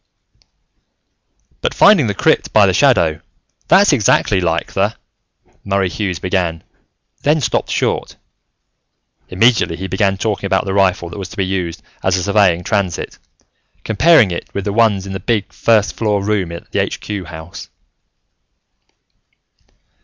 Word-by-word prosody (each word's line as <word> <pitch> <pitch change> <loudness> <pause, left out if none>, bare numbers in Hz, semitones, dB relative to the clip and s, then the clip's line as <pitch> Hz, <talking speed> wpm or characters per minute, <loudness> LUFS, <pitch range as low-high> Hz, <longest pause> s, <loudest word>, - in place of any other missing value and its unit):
"But, 485 - -2
finding 195 - +5
the 100 - -2
crypt - - +1
by - - +5
the - - +2
shadow, 80 -2 +2 0.5
that's 195 -2 +5
exactly 105 -5 +2
like 85 -1 -2
the 100 +3 0 0.3
" - - -39
Murray 100 -2 0
Hughes 95 -2 -3
began, 90 -3 -2 0.6
then 150 +2 +2
stopped 135 - -1
short. - - -2 1.1
Immediately, 110 -2 +2
he 95 +3 -6
began 95 +1 0
talking 100 -1 -2
about 95 -1 0
the 95 - -3
rifle 95 -3 +1
that 100 - -8
was 95 -2 -6
to - - -13
be 95 - 0
used 90 -3 -4 0.2
as 95 0 +1
a 90 - -2
surveying 100 -3 +2
transit, 100 -5 -2 0.6
comparing 120 - +4
it 85 - -6
with 100 - -2
the 100 - -2
ones 105 -4 +2
in 95 - -7
the 95 - -4
big 105 0 -2
first 110 -2 +1
floor 105 -3 -1
room 100 -4 -1
at 85 0 -10
the - - -1
Aitch - - -3
Cue 100 -3 -6
House. 80 +1 -10
100 Hz, 150 wpm, -17 LUFS, 90-105 Hz, 1.1 s, finding